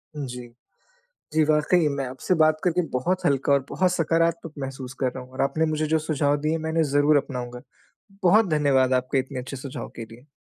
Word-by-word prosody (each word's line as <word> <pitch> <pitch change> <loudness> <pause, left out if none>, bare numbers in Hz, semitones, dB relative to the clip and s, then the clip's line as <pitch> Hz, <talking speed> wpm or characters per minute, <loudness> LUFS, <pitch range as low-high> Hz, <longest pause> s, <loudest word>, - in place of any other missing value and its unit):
जी। 125 -4 -6 0.9
जी, 155 0 +4
वाक़ई 155 +2 +3
मैं 140 -1 -2
आपसे 130 +8 -2
बात 155 -1 +4
करके 180 -1 +2
बहुत 180 +9 -1
हल्का 140 0 +2
और 140 - +4
बहुत 185 -1 +1
सकारात्मक 165 -1 0
महसूस 135 -1 -6
कर 130 -2 0
रहा 130 0 -7
हूँ। 125 - -17
और 130 - -3
आपने 140 +4 +1
मुझे 155 0 -1
जो 160 +1 +2
सुझाव 145 -2 0
दिए, 155 +2 0
मैं 160 0 -4
उन्हें 160 0 +2
ज़रूर 145 +1 +3
अपनाऊँगा। 125 -3 -4 0.6
बहुत 215 +5 +5
धन्यवाद 140 -4 +3
आपके 130 +1 +1
इतने 130 0 -4
अच्छे 130 +2 -7
सुझाव 130 -1 -7
के 115 - -6
लिए। 115 +5 -16
145 Hz, 195 wpm, -24 LUFS, 130-160 Hz, 0.9 s, बहुत